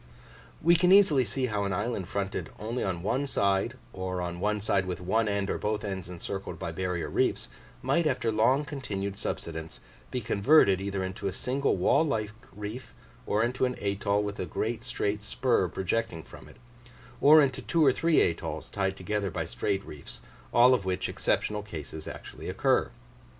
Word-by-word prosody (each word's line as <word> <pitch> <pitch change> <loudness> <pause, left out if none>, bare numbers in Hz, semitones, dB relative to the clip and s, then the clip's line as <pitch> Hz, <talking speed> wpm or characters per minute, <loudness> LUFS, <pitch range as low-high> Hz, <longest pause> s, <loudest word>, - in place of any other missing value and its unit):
We 170 +2 +6
can 180 +2 +4
easily 185 -9 +6
see 130 +2 -1
how 105 -4 -1
an 100 -1 -1
island 105 -1 -2
fronted 100 0 -3
only 115 +4 -3
on 90 -3 -2
one 130 +8 0
side, 100 +1 +1 0.2
or 95 -1 -3
on 85 -1 -4
one 105 +2 0
side 100 -2 +1
with 90 - -3
one 110 +5 +1
end 100 -1 0
or - - -2
both 105 0 -1
ends 95 -4 -4
encircled 90 0 -5
by 85 - -4
barrier 90 0 -2
reefs, - - 0 0.3
might 150 +5 +2
after 125 -5 0
long 130 +7 +3
continued 100 -9 -4
subsidence 80 -4 -5 0.3
be 125 - -2
converted 105 -2 +4
either 100 -1 -2
into 95 +1 -4
a - - -1
single 130 +5 0
wall 90 - +4
like 110 -9 -1 0.2
reef, 105 +5 -7 0.3
or 105 +2 +2
into 125 +3 -1
an 125 -1 +1
atoll 100 0 0
with 100 -1 -4
a 90 - -2
great 110 +8 -2
straight 105 0 -2
spur 110 -2 +1
projecting 95 -1 -2
from - - -13
it, - - -16 0.6
or 155 +2 +8
into 135 -4 +2
two 165 -2 +2
or 135 - +7
three 165 +5 +3
atolls 85 - -2
tied 95 -1 -1
together 100 +1 -2
by - - -3
straight 100 0 -2
reefs 75 -2 -9 0.3
all 125 +2 +6
of 125 - +1
which 95 -1 -1
exceptional 105 0 0
cases 80 -6 -8
actually - - -8
occur. - - +2
105 Hz, 180 wpm, -28 LUFS, 95-125 Hz, 0.6 s, or